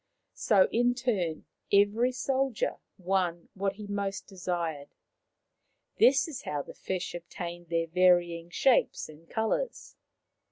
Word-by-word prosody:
So, 195 -3 +4
in 245 +1 +2
turn, 200 -11 -1 0.3
every 205 +5 +4
soldier 265 -1 -1 0.2
won 180 -2 -1
what 195 0 -1
he 210 +1 -9
most 200 -1 -3
desired. 170 -6 -4 1.0
This 275 +3 +5
is 305 -5 -6
how 145 -1 -3
the - - -11
fish 185 -1 -4
obtained 175 0 -7
their 165 0 +1
varying 175 -1 +3
shapes 255 +7 +2
and 155 +2 -15
colours. 230 - -2
190 Hz, 120 wpm, -29 LUFS, 170-225 Hz, 1.0 s, This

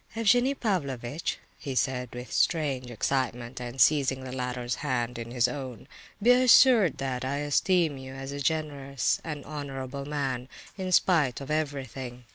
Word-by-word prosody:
"Evgenie 245 +5 +3
Pavlovitch," 145 - -2 0.2
he 135 -2 -5
said, 125 -1 0
with 125 +1 -7
strange 140 -7 +1
excitement 120 0 -2
and 120 +1 -6
seizing 135 0 +4
the 130 - -6
latter's 125 -1 -3
hand 125 -4 -1
in 115 0 -6
his 120 0 +2
own, 130 -2 -6 0.3
"be 235 +4 +5
assured 250 - +6
that 130 -2 -3
I 135 +2 -1
esteem 145 +1 +1
you 130 0 -9
as 135 +1 -6
a 140 - -5
generous 140 -3 -1
and 150 -3 -6
honourable 140 -2 -5
man, 135 -4 -3 0.3
in 185 -1 -4
spite 160 -9 +3
of 140 +1 -6
everything. 135 -5 -3
135 Hz, 150 wpm, -28 LUFS, 125-155 Hz, 0.3 s, assured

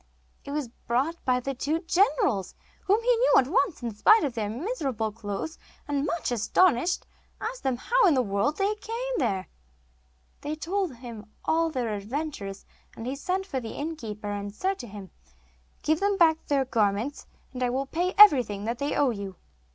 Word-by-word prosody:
It - - -10
was 290 -2 -2 0.2
brought 275 +8 0
by 250 -1 +3
the 275 +2 -3
two 300 +5 -1
generals, 345 - +1 0.3
whom 420 +4 +3
he - - +4
knew - - +3
at 255 - +4
once 355 - +1
in 235 -2 -3
spite 430 - +5
of 280 -5 -1
their 215 -3 -2
miserable 260 - -2
clothes, 210 +8 -5 0.3
and, 290 0 0
much 315 -3 -2
astonished, 290 - +2 0.3
asked 475 +4 -4
them 260 -2 0
how - - +3
in 325 - +4
the 255 - +3
world 200 +8 0
they 400 +1 +1
came 460 +4 -4
there. 190 -1 0 0.9
They 300 +1 -3
told 355 -1 -2
him 230 -3 -10
all 330 +1 +2
their 245 -7 -2
adventures, 210 -2 -5 0.3
and 225 - -6
he 260 +2 -2
sent 370 +7 -2
for 270 -9 -3
the 230 -3 -7
innkeeper, 225 -10 -5
and 205 0 -4
said 385 - -1
to 240 - -7
him: 200 -2 -10 0.7
'Give 310 +1 +2
them 405 0 +1
back 320 -2 +3
their 275 -2 +2
garments, 225 +3 0 0.3
and 255 - -6
I 250 - +2
will 265 +3 -1
pay 350 +6 -1
everything 250 - +7
that 235 +1 -2
they 285 +1 -1
owe 280 -3 +3
you. 200 -4 -6
275 Hz, 180 wpm, -27 LUFS, 225-350 Hz, 0.9 s, everything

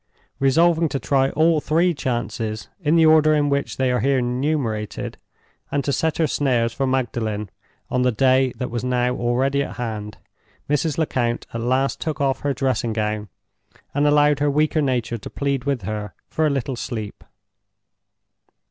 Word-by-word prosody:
Resolving 165 +4 +3
to 135 - -2
try 135 -1 +2
all 160 +1 +2
three 170 +5 +2
chances, 120 -5 -3
in 160 -2 +2
the 165 -1 +5
order 155 -1 +5
in 145 -1 +2
which 140 0 -1
they 130 -1 +1
are 125 - +1
here 135 +4 +2
enumerated, 125 -4 -2 0.5
and 140 -1 0
to 140 - -1
set 160 +2 0
her 165 - +3
snares 125 -6 +1
for 135 +2 -1
Magdalen 110 -5 -2 0.4
on 125 - +1
the 125 0 +3
day 130 +2 +3
that 125 -2 -4
was 120 0 -3
now 125 0 +1
already 130 +4 +1
at 140 - -4
hand, 105 -3 -5 0.5
Mrs. 150 +1 0
Lecount 120 -7 0
at 115 - -3
last 130 +3 0
took 155 -3 -3
off 135 -1 +1
her 145 - -1
dressing 130 -4 -1
gown 105 -1 -2 0.6
and 145 +1 +2
allowed 145 -1 +4
her 145 0 +2
weaker 155 +2 +2
nature 120 -4 -1
to - - -8
plead 140 -2 -2
with 140 -7 -1
her 105 0 -5
for 155 0 0
a - - +2
little 135 -2 -2
sleep. 110 -4 -6
135 Hz, 170 wpm, -22 LUFS, 120-145 Hz, 0.6 s, the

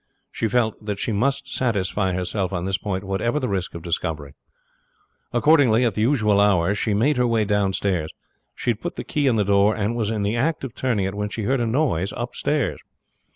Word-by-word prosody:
She 115 - -1
felt 110 -1 0
that 105 -1 -3
she 105 - -2
must 135 +6 -1
satisfy 100 -5 0
herself 95 +1 -2
on 90 -2 -3
this 95 0 -1
point 95 -1 -3
whatever 100 +8 -1
the 130 - -2
risk 95 -4 -3
of 85 - -7
discovery. 80 -4 -3 1.0
Accordingly 125 -3 +4
at 115 - +1
the 105 - -2
usual 110 -5 +3
hour 100 -2 +3
she 105 0 0
made 130 +7 +2
her 125 0 +3
way 115 -2 +1
downstairs. 95 -5 0 0.5
She 120 - 0
had 115 - -5
put 175 - -4
the - - -5
key 145 -3 0
in 125 - +3
the 105 - +2
door, 100 +2 +3
and 110 +2 -1
was 110 -3 -1
in 110 -2 -1
the 105 +3 0
act 150 +6 0
of 130 -4 -5
turning 115 -8 0
it 95 - -2
when 105 0 -3
she 110 - -4
heard 130 +4 +1
a 120 - 0
noise 110 - 0
upstairs. 125 +4 -1
105 Hz, 210 wpm, -23 LUFS, 95-120 Hz, 1.0 s, Accordingly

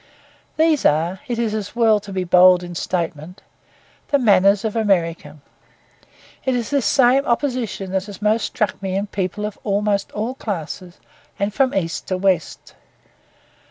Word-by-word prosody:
These 315 -2 +3
are 165 +5 +1
(it 240 -2 -2
is 230 -2 -1
as 215 0 -5
well 225 -3 +4
to 205 -1 -11
be 190 -1 -2
bold 180 0 +5
in 175 0 -7
statement) 170 0 -4 0.6
the 285 - +2
manners 200 -4 +4
of 220 - -2
America. 170 -8 0 1.1
It 260 -1 0
is 240 0 -3
this 275 -7 +1
same 265 +1 +4
opposition 235 -6 -2
that 190 0 -1
has 200 -2 -9
most 215 +2 +1
struck 215 -4 -2
me 190 -1 -3
in 200 +1 -1
people 200 +1 -3
of 210 - -6
almost 205 -1 0
all 220 +4 -3
classes 180 - -6 0.4
and 200 +1 -1
from 265 0 +2
east 165 -4 -2
to 185 - -1
west. 185 -3 -1
200 Hz, 160 wpm, -20 LUFS, 185-230 Hz, 1.1 s, bold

